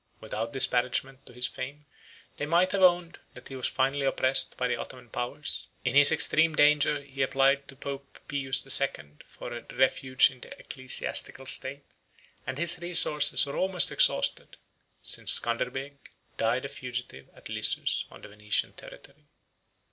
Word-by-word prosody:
43 - - -14
Without 115 +2 -5
disparagement 130 +1 0
to - - -11
his 125 +1 0
fame, 140 +3 -8 0.5
they 145 - -5
might 175 +3 +1
have 195 0 -2
owned, 175 -2 +2 0.2
that - - -13
he 135 - -9
was 130 - -2
finally 135 +2 -1
oppressed 135 0 +2
by 125 - -1
the 125 - -2
Ottoman 125 -3 -10
powers: 140 +5 -5 0.2
in 125 - -1
his 145 +1 +7
extreme 160 0 +3
danger 150 -1 +2
he 135 -1 -8
applied 135 +1 +1
to 135 - -12
Pope 140 0 -9
Pius 135 -2 -1
the 135 - -4
Second 75 - 0
for 120 - -10
a 120 - -8
refuge 130 0 +2
in 130 - -17
the - - -13
ecclesiastical 130 0 -1
state; 135 +1 +1 0.6
and 130 +1 -5
his 170 +2 +3
resources 160 -5 +4
were 140 - -7
almost 185 -4 +1
exhausted, - - +2 0.5
since - - 0
Scanderbeg 130 +4 -5 0.4
died 120 +4 -1
a - - -3
fugitive 120 - -8
at - - -12
Lissus, - - 0
on - - -16
the - - -10
Venetian 105 0 -3
territory. - - -16
135 Hz, 165 wpm, -26 LUFS, 125-145 Hz, 0.6 s, his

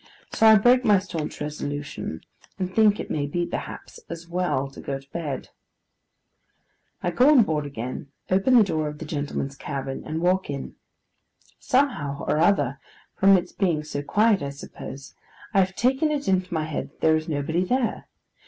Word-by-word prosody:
So 225 - +5
I 220 - +9
break 245 +4 +5
my 210 -4 +5
staunch 175 -5 -4
resolution, 145 - -5 0.4
and 185 -1 -3
think 215 -2 +5
it - - -5
may 145 -2 -1
be, 175 +4 -1
perhaps, - - -7
as 170 0 -7
well 175 -6 -1
to - - -11
go 135 - -3
to 135 +1 -17
bed. 150 -6 -4 1.5
I 175 - 0
go 250 - +5
on 280 -6 +7
board 150 -6 -1
again; 130 0 -6 0.2
open 195 +8 +4
the 225 - +8
door 155 -6 -1
of 150 0 -6
the 160 - -7
gentlemen's 145 -2 -3
cabin 135 -1 -5
and 155 +1 -4
walk 185 +1 +1
in. 140 -1 -5 0.9
Somehow 245 - 0
or 150 - +1
other—from 160 +4 +2
its 180 0 -4
being 170 -6 0
so 150 -2 -4
quiet, 210 +6 +3
I 140 - -3
suppose—I 140 +7 -7
have 190 0 +1
taken 265 +6 +2
it 290 -1 -2
into 185 -1 +1
my 160 -2 0
head 155 -1 -4
that - - -32
there 160 0 +5
is 155 +1 -3
nobody 160 +4 0
there. 245 +3 -1
165 Hz, 170 wpm, -25 LUFS, 145-200 Hz, 1.5 s, I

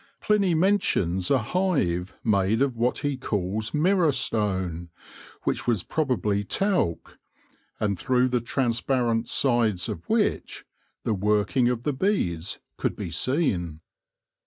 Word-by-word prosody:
Pliny 200 -5 +2
mentions 155 - +1
a 140 - +4
hive 115 - -1
made 105 +3 +2
of 135 -3 -1
what 120 +2 0
he 145 -2 0
calls 105 -2 -2
mirror 170 +1 +3
stone, 95 -9 -1 0.5
which - - -1
was 115 -7 +1
probably 110 -9 0
talc, 180 - -1 0.6
and 100 -4 -1
through 130 -1 +2
the 125 -1 0
transparent 120 -1 0
sides 115 -8 +1
of - - -7
which - - 0 0.4
the 110 - 0
working 105 +5 +2
of 120 -1 -2
the 150 - 0
bees 100 - -1 0.2
could - - -1
be 85 - -5
seen. 90 - 0
115 Hz, 125 wpm, -25 LUFS, 100-140 Hz, 0.6 s, a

